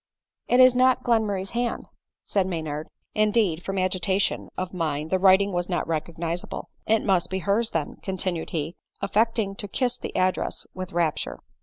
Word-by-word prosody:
" -, -, -67 dB
It 245 Hz, -, +4 dB
is 255 Hz, -1 st, +8 dB
not 255 Hz, 0 st, +4 dB
Glenmurray's 205 Hz, -5 st, +1 dB
hand," 240 Hz, 0 st, -2 dB, 0.4 s
said 195 Hz, -2 st, +1 dB
Maynard 155 Hz, -3 st, -3 dB, 0.2 s
— -, -, -52 dB
(in 215 Hz, 0 st, +3 dB
deed, 205 Hz, -7 st, +1 dB
from 195 Hz, +1 st, -4 dB
agitation 185 Hz, +1 st, 0 dB
of 185 Hz, 0 st, -3 dB
mind 155 Hz, -3 st, -2 dB
the 185 Hz, -, +2 dB
writing 195 Hz, +1 st, +5 dB
was 175 Hz, 0 st, -2 dB
not 175 Hz, -, 0 dB
recog 160 Hz, +1 st, -3 dB
nisable.) 170 Hz, +1 st, -3 dB, 0.2 s
" -, -, -30 dB
It -, -, -6 dB
must 190 Hz, -4 st, +2 dB
be 190 Hz, -, -1 dB
hers 205 Hz, +5 st, +1 dB
then," 155 Hz, -3 st, -3 dB
continued 185 Hz, -3 st, -2 dB
he, 160 Hz, +1 st, -3 dB, 0.2 s
affecting 215 Hz, 0 st, +1 dB
to 205 Hz, -, -4 dB
kiss 245 Hz, +4 st, 0 dB
the -, -, -6 dB
address 185 Hz, 0 st, 0 dB
with 185 Hz, 0 st, -6 dB
rapture. 170 Hz, -4 st, -1 dB
190 Hz, 185 wpm, -25 LUFS, 170-210 Hz, 0.4 s, is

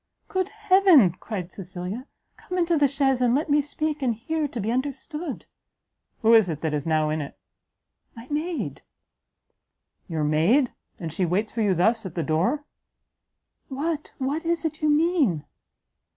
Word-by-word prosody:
"Good 375 Hz, -1 st, -1 dB
heaven!" 380 Hz, -, +5 dB
cried 185 Hz, -5 st, -5 dB
Cecilia, 190 Hz, +7 st, -6 dB, 0.3 s
"come 365 Hz, -, -6 dB
into 340 Hz, -1 st, +2 dB
the 290 Hz, -2 st, +4 dB
chaise, 270 Hz, -2 st, +1 dB
and 245 Hz, 0 st, +3 dB
let 295 Hz, +1 st, 0 dB
me 295 Hz, +1 st, +5 dB
speak 300 Hz, +1 st, -3 dB
and 245 Hz, -4 st, +1 dB
hear 310 Hz, +6 st, -2 dB
to 250 Hz, -, -6 dB
be 215 Hz, +2 st, -1 dB
understood!" 280 Hz, +4 st, -4 dB, 0.8 s
"Who 225 Hz, +1 st, +6 dB
is 220 Hz, -4 st, +7 dB
that 150 Hz, -2 st, -2 dB
now 155 Hz, -1 st, +2 dB
in 155 Hz, 0 st, -1 dB
it?" 140 Hz, -, -8 dB, 0.8 s
"My 230 Hz, 0 st, -10 dB
Maid." 320 Hz, +3 st, -3 dB, 1.3 s
"Your 160 Hz, -4 st, -2 dB
maid? 170 Hz, -, +3 dB, 0.3 s
and 165 Hz, -4 st, -5 dB
she 185 Hz, -, -1 dB
waits 190 Hz, +5 st, 0 dB
for 230 Hz, -, -2 dB
you 200 Hz, -3 st, +2 dB
thus 225 Hz, +6 st, +2 dB
at 170 Hz, -, -11 dB
the 170 Hz, -, -1 dB
door?" 185 Hz, -, 0 dB, 1.0 s
"What, 300 Hz, +3 st, -3 dB
what 280 Hz, +4 st, -2 dB
is 335 Hz, 0 st, -1 dB
it 315 Hz, 0 st, -3 dB
you 305 Hz, -, +2 dB
mean?" 295 Hz, -, +2 dB
255 Hz, 155 wpm, -25 LUFS, 180-305 Hz, 1.3 s, is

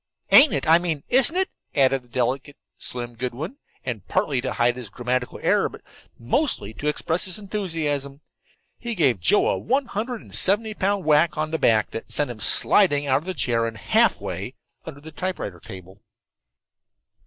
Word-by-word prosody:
"Ain't 285 Hz, +1 st, +9 dB
it -, -, -2 dB
I 165 Hz, +2 st, +6 dB
mean 165 Hz, -5 st, -3 dB
isn't 265 Hz, +6 st, +4 dB
it?" 380 Hz, 0 st, 0 dB, 0.2 s
added 135 Hz, -1 st, +3 dB
the 125 Hz, -, -24 dB
delicate 130 Hz, +4 st, -2 dB, 0.2 s
Slim 120 Hz, -1 st, -4 dB
Goodwin, 130 Hz, -, -5 dB, 0.3 s
and, 120 Hz, -6 st, -4 dB
partly 135 Hz, -4 st, 0 dB
to 130 Hz, -, -3 dB
hide 120 Hz, 0 st, +2 dB
his 125 Hz, -4 st, -7 dB
grammatical 125 Hz, +3 st, -3 dB
error, -, -, +2 dB
but -, -, -14 dB, 0.3 s
mostly 120 Hz, -, -1 dB
to 145 Hz, +8 st, -5 dB
express 160 Hz, +3 st, -1 dB
his 185 Hz, -2 st, -2 dB
enthusiasm, 160 Hz, -9 st, -3 dB, 0.6 s
he 235 Hz, -1 st, -4 dB
gave 135 Hz, -, +2 dB
Joe 205 Hz, -, +3 dB
a -, -, 0 dB
one 270 Hz, +4 st, 0 dB
hundred 235 Hz, +1 st, -4 dB
and -, -, -15 dB
seventy 215 Hz, +3 st, +3 dB
pound 200 Hz, -2 st, -1 dB
whack 155 Hz, +2 st, +3 dB
on 155 Hz, 0 st, -2 dB
the 160 Hz, -, -2 dB
back 110 Hz, -2 st, +2 dB
that 115 Hz, -, -7 dB
sent 145 Hz, -4 st, +1 dB
him 115 Hz, -, -10 dB
sliding 145 Hz, -, +3 dB
out 135 Hz, -1 st, +2 dB
of 155 Hz, -, -15 dB
the 185 Hz, 0 st, -4 dB
chair 115 Hz, -1 st, +1 dB
and 115 Hz, -1 st, -7 dB
half -, -, +2 dB
way -, -, -6 dB, 0.3 s
under 140 Hz, -, -9 dB
the 160 Hz, +2 st, -11 dB
typewriter 160 Hz, -, -5 dB
table. 95 Hz, +3 st, -11 dB
145 Hz, 180 wpm, -23 LUFS, 125-190 Hz, 0.6 s, Ain't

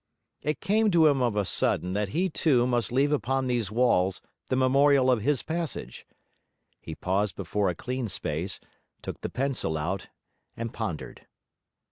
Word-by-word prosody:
It 150 Hz, -1 st, -2 dB
came 215 Hz, +2 st, +2 dB
to 170 Hz, -4 st, +5 dB
him 140 Hz, -3 st, +4 dB
of 120 Hz, -4 st, +1 dB
a 105 Hz, -1 st, +1 dB
sudden 90 Hz, 0 st, 0 dB
that 105 Hz, 0 st, -1 dB
he 180 Hz, -, +1 dB
too 145 Hz, -7 st, +2 dB
must 120 Hz, -2 st, 0 dB
leave 140 Hz, +4 st, +2 dB
upon 135 Hz, -2 st, 0 dB
these 120 Hz, -5 st, 0 dB
walls 105 Hz, -5 st, +2 dB, 0.3 s
the -, -, 0 dB
memorial 135 Hz, 0 st, +4 dB
of 120 Hz, -4 st, +2 dB
his 140 Hz, +4 st, +1 dB
passage. 165 Hz, 0 st, -4 dB, 0.7 s
He 80 Hz, -, -8 dB
paused 95 Hz, +1 st, -1 dB
before 100 Hz, +1 st, -1 dB
a 90 Hz, -, -2 dB
clean 125 Hz, +4 st, -3 dB
space, 90 Hz, -1 st, -3 dB, 0.4 s
took -, -, -6 dB
the -, -, -3 dB
pencil 130 Hz, -, -1 dB
out, 85 Hz, +5 st, -3 dB, 0.5 s
and 115 Hz, 0 st, -4 dB
pondered. 95 Hz, -9 st, -5 dB
125 Hz, 160 wpm, -27 LUFS, 100-140 Hz, 0.7 s, to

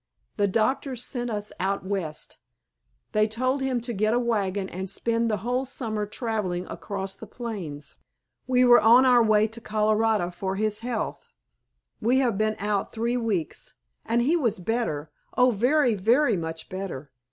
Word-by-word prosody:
The 205 Hz, -1 st, +3 dB
doctors 250 Hz, +4 st, 0 dB
sent 245 Hz, -1 st, -3 dB
us 210 Hz, -2 st, -3 dB
out 195 Hz, +1 st, -1 dB
West. 185 Hz, -6 st, -4 dB, 0.7 s
They 215 Hz, 0 st, +3 dB
told 255 Hz, +5 st, 0 dB
him 265 Hz, -2 st, 0 dB
to 240 Hz, +1 st, -4 dB
get 215 Hz, +2 st, +1 dB
a -, -, +3 dB
wagon 205 Hz, -5 st, 0 dB
and 190 Hz, +1 st, -5 dB
spend 230 Hz, +3 st, 0 dB
the 215 Hz, -, +1 dB
whole 250 Hz, +2 st, 0 dB
summer 220 Hz, -5 st, -3 dB
traveling 210 Hz, -5 st, -2 dB
across 195 Hz, -1 st, -5 dB
the 220 Hz, -, -11 dB
plains. 195 Hz, -12 st, -6 dB, 0.5 s
We 255 Hz, -1 st, +4 dB
were 240 Hz, -1 st, +7 dB
on 240 Hz, +4 st, +7 dB
our 250 Hz, -2 st, +6 dB
way 215 Hz, -1 st, +4 dB
to 230 Hz, +2 st, -10 dB
Colorado 215 Hz, -3 st, +1 dB
for 190 Hz, +2 st, -3 dB
his 215 Hz, +1 st, -1 dB
health. 235 Hz, -2 st, -4 dB, 0.7 s
We 240 Hz, +4 st, +3 dB
have 250 Hz, -5 st, +2 dB
been 215 Hz, +1 st, +1 dB
out 205 Hz, -1 st, -1 dB
three 235 Hz, +2 st, -1 dB
weeks, 220 Hz, -9 st, -2 dB, 0.3 s
and 235 Hz, +1 st, +1 dB
he 305 Hz, +7 st, +3 dB
was 250 Hz, -, +1 dB
better, 180 Hz, -7 st, -2 dB, 0.3 s
oh, 250 Hz, 0 st, +5 dB
very, 250 Hz, +4 st, +3 dB
very 230 Hz, +7 st, +3 dB
much 160 Hz, -2 st, -5 dB
better. 185 Hz, -7 st, -6 dB
215 Hz, 165 wpm, -26 LUFS, 195-240 Hz, 0.7 s, were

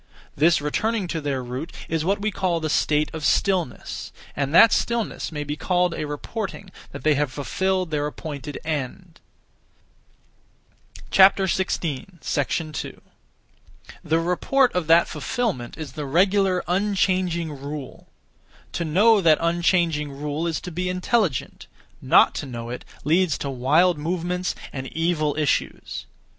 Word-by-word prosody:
This 155 Hz, +1 st, +4 dB
returning 210 Hz, +8 st, 0 dB
to 160 Hz, -, -2 dB
their 140 Hz, -3 st, -2 dB
root 130 Hz, +7 st, -5 dB, 0.2 s
is 160 Hz, -1 st, -1 dB
what 195 Hz, +4 st, +1 dB
we 215 Hz, +1 st, -1 dB
call 180 Hz, -3 st, 0 dB
the 155 Hz, -2 st, -2 dB
state 150 Hz, 0 st, +1 dB
of 160 Hz, -1 st, -6 dB
stillness; 180 Hz, -4 st, 0 dB, 0.2 s
and 140 Hz, -1 st, -1 dB
that 210 Hz, +7 st, +8 dB
stillness 235 Hz, -6 st, -1 dB
may 150 Hz, -2 st, -3 dB
be 145 Hz, 0 st, -4 dB
called 180 Hz, +2 st, +1 dB
a 150 Hz, -, -3 dB
reporting 195 Hz, +6 st, -5 dB, 0.2 s
that -, -, -9 dB
they 155 Hz, -, +4 dB
have 145 Hz, -2 st, 0 dB
fulfilled 185 Hz, +5 st, -1 dB
their 145 Hz, -1 st, 0 dB
appointed 145 Hz, -1 st, -6 dB
end. 160 Hz, +4 st, -4 dB, 1.9 s
2. -, -, +5 dB
The 170 Hz, -4 st, -1 dB
report 210 Hz, +10 st, +2 dB
of 180 Hz, -3 st, -1 dB
that 165 Hz, +1 st, +6 dB
fulfilment 155 Hz, -, -3 dB
is 155 Hz, -3 st, -6 dB
the 150 Hz, -3 st, -5 dB
regular, 185 Hz, +4 st, +2 dB
unchanging 185 Hz, -3 st, +1 dB
rule. 140 Hz, -1 st, -7 dB, 0.6 s
To 170 Hz, -, -2 dB
know 200 Hz, +7 st, +4 dB
that 160 Hz, -3 st, +5 dB
unchanging 170 Hz, -3 st, +1 dB
rule 150 Hz, +3 st, -3 dB
is 165 Hz, -, -1 dB
to 180 Hz, -, -7 dB
be 180 Hz, +2 st, -2 dB
intelligent; 185 Hz, -, -1 dB, 0.3 s
not -, -, +5 dB
to 145 Hz, -, -8 dB
know 120 Hz, -2 st, -6 dB
it 125 Hz, -, -7 dB, 0.2 s
leads 165 Hz, +1 st, +2 dB
to 140 Hz, -, -4 dB
wild 150 Hz, +7 st, +3 dB
movements 180 Hz, +3 st, -2 dB, 0.2 s
and 130 Hz, -1 st, -5 dB
evil 160 Hz, -2 st, 0 dB
issues. 150 Hz, -3 st, -1 dB
165 Hz, 135 wpm, -23 LUFS, 150-185 Hz, 1.9 s, that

